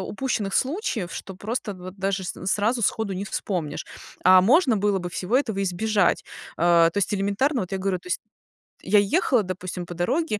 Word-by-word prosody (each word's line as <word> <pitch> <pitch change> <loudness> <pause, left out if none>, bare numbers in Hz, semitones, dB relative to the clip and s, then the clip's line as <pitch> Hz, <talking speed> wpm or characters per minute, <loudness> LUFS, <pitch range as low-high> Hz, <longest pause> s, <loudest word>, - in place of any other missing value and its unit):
упущенных 210 -2 -2
случаев, 265 - -1
что 190 - -7
просто 215 +1 -4
вот 185 +1 -10
даже 195 0 -1
с - - -3
сразу 220 +5 +1
сходу 200 +1 0
не 190 +2 -3
вспомнишь. 180 -6 -3 0.4
А 185 0 +8
можно 255 - +4
было 200 -1 +1
бы 175 -1 -5
всего 190 +8 0
этого 220 -8 0
избежать. 205 +3 +1 0.3
А, 170 0 +5
то 200 - -3
есть 200 - 0
элементарно, 205 +7 +1
вот 185 - -8
я 195 - -1
говорю, 190 -1 -1
то - - -21
есть 360 - -1 0.6
я 205 +2 +4
ехала, 245 - +2
допустим, 185 -1 -5
по 175 - -8
дороге 215 - -1
200 Hz, 185 wpm, -24 LUFS, 185-225 Hz, 0.6 s, А